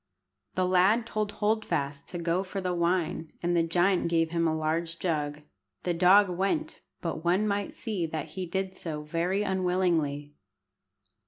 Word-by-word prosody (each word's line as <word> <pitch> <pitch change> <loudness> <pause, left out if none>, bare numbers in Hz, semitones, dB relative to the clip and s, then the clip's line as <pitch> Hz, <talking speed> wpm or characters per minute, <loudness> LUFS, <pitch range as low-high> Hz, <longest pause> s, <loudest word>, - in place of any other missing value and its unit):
The 185 - +2
lad 190 +6 +4
told 215 -2 -2
Hold 220 +1 +1
fast 140 -6 -3
to 175 - -5
go 170 +1 0
for 195 +1 -5
the 180 -1 -1
wine, 170 -2 0
and 175 0 +1
the 170 - +4
giant 175 +3 +2
gave 165 -1 +1
him 170 -1 +1
a 160 0 0
large 165 +2 -1
jug. 150 -4 -2 0.4
The 175 - 0
dog 190 +4 +6
went, 195 - -1 0.2
but 165 -2 -3
one 185 +5 +2
might 200 -1 -2
see 200 -8 -2
that 155 -1 -4
he 185 +3 -5
did 190 +2 -2
so 150 -3 -5
very 175 +6 0
unwillingly. 180 -7 0
175 Hz, 165 wpm, -28 LUFS, 165-190 Hz, 0.4 s, dog